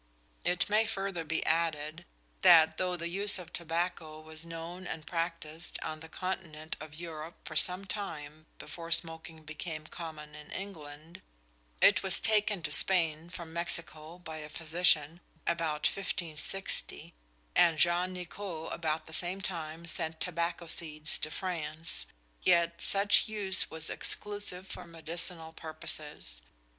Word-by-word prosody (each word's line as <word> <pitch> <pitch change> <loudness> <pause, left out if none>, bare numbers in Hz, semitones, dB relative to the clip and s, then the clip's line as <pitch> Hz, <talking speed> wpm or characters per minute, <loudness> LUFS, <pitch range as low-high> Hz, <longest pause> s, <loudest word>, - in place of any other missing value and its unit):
It 180 +1 +2
may 215 +2 +4
further 195 -4 -2
be 160 +1 -1
added 160 0 0 0.4
that 165 -4 +8
though 180 -1 0
the 170 0 -3
use 200 +4 +4
of 175 -2 -9
tobacco 165 -2 -2
was 155 0 -5
known 170 +2 -6
and 155 -2 -5
practised 165 -1 -3
on 155 - -4
the 160 +1 -10
continent 170 -4 -4
of 155 -1 -9
Europe 165 0 -6
for 155 - -6
some 180 +5 +3
time 155 -6 -5
before 165 +2 -7
smoking 165 -1 -2
became 155 0 -5
common 155 -2 -7
in 150 0 -10
England 160 -4 -8 0.6
it 205 - +7
was 190 -2 +1
taken 210 -4 +2
to - - -1
Spain 165 -1 +3
from 170 -2 -8
Mexico 170 -1 0
by 160 -3 -7
a 150 -1 -7
physician 160 0 +2 0.3
about 165 -3 0
1560, 185 0 -1 0.4
and 165 -2 +6
Jean 175 +2 +4
Nicot 180 -2 -5
about 160 -1 -1
the 160 - -8
same 180 +4 +2
time 165 -3 -4
sent 160 -2 +2
tobacco 170 0 -1
seeds 155 -1 +1
to - - -1
France 165 -2 -1 0.3
yet 170 -1 +3
such 200 +3 +5
use 205 -3 0
was 160 0 -3
exclusively 205 -3 +1
for - - -6
medicinal 165 0 -2
purposes. 150 - -4
165 Hz, 135 wpm, -32 LUFS, 155-180 Hz, 0.6 s, that